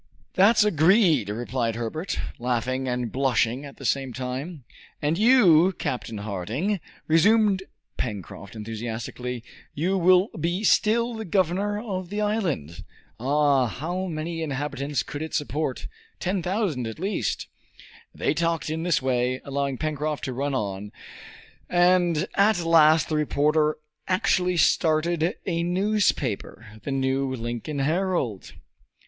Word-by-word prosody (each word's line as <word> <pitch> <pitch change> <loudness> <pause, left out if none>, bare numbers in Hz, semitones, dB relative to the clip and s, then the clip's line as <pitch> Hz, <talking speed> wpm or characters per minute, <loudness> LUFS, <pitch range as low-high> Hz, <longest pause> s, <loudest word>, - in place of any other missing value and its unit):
"That's 210 +3 +5
agreed," 170 - +4
replied 115 +1 -2
Herbert, 120 - -3 0.2
laughing 125 +2 -1
and 125 -2 -2
blushing 130 0 +1
at 140 - -11
the 135 - -9
same 135 0 0
time. 130 +5 -5 0.4
"And 150 +2 0
you, 190 -6 +5
Captain 120 -3 -3
Harding," 110 - -2 0.3
resumed 200 +4 +4 0.4
Pencroft 100 -2 -6
enthusiastically, 115 +2 -5 0.3
"you 185 +6 0
will 185 +3 +5
be 175 +5 -2
still 230 +2 +3
the 220 -1 -5
governor 195 +2 0
of 190 -5 -5
the 205 +2 -3
island! 185 - -2 0.4
Ah, 140 0 +3
how 175 - -3
many 165 0 -4
inhabitants 140 -3 -2
could 145 - -7
it 160 - -4
support? 145 -2 -2 0.3
Ten 185 +1 -1
thousand 180 - -1
at 110 - -6
least!" 195 +3 -2 0.7
They - - -1
talked 165 0 -1
in 160 +1 -2
this 170 -5 +1
way, 130 0 0
allowing 140 -1 -2
Pencroft 155 0 -2
to 130 - -3
run 140 +2 -2
on, 100 -3 -3 0.8
and 175 -2 +3
at 205 +1 +4
last 160 -1 +5
the 155 - -1
reporter 150 +1 +2 0.3
actually 180 -1 +1
started 165 +2 +2
a 170 -2 -1
newspaper 170 - -1
the 140 - -5
New 135 0 0
Lincoln 120 +5 -4
Herald! 155 - -1
155 Hz, 125 wpm, -25 LUFS, 125-180 Hz, 0.8 s, That's